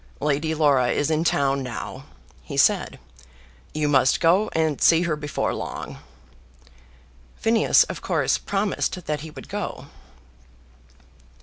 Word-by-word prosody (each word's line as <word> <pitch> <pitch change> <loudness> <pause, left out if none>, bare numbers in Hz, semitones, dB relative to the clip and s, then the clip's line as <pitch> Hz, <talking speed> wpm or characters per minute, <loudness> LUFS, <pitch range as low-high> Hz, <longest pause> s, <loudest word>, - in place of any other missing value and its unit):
"Lady 150 +2 0
Laura 140 -5 +3
is 145 +5 0
in 155 +1 +1
town 140 -4 +1
now," 125 -2 -7 0.4
he - - -8
said; - - +2 0.7
"you 150 -1 -1
must 135 -2 +3
go 185 +5 +3
and 160 -3 0
see 165 +1 +5
her 170 -3 0
before 150 -1 -3
long." - - -6 1.4
Phineas 225 0 +4
of - - -7
course - - 0
promised 195 -3 -2
that 150 -1 -2
he 160 - -8
would 150 - -11
go. - - -6
155 Hz, 125 wpm, -23 LUFS, 145-165 Hz, 1.4 s, see